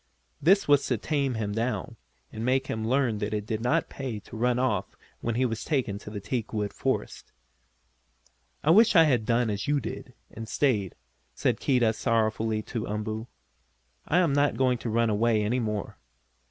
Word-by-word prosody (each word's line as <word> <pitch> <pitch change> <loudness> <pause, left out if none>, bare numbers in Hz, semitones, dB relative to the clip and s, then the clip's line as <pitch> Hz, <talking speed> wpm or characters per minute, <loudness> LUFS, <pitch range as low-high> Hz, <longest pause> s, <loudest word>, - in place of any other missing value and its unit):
This 195 +6 +4
was 145 -1 +5
to 125 - +1
tame 140 0 -1
him 105 -2 -2
down, 115 -2 -2 0.4
and 110 - -5
make 130 +2 +1
him 110 -3 -3
learn 125 -4 +1
that 105 0 -2
it 105 -1 -3
did 110 0 -3
not 125 - +1
pay 130 -6 -5
to - - -12
run 120 +2 +1
off 130 +1 -1 0.2
when 115 -1 -2
he 130 +2 +2
was 115 -2 -3
taken 125 -10 -1
to 105 - -10
the 105 -1 -5
teakwood 105 -1 -3
forest. - - -3 1.3
"I 155 - +4
wish 220 +4 +6
I 165 - +9
had 125 -8 +1
done 115 -1 +2
as 100 -1 -3
you 145 0 +2
did, - - -7 0.2
and 115 0 -8
stayed," 110 -10 0 0.4
said - - 0
Keedah 120 -5 +2
sorrowfully 110 -1 0
to 115 0 -4
Umboo. 110 +2 -4 0.8
"I 170 - +2
am 175 -6 +3
not 145 +1 +2
going 125 -2 +2
to 115 - -4
run 115 0 +2
away 110 0 +2
any 120 +5 0
more." 105 -3 -3
115 Hz, 180 wpm, -27 LUFS, 110-130 Hz, 1.3 s, I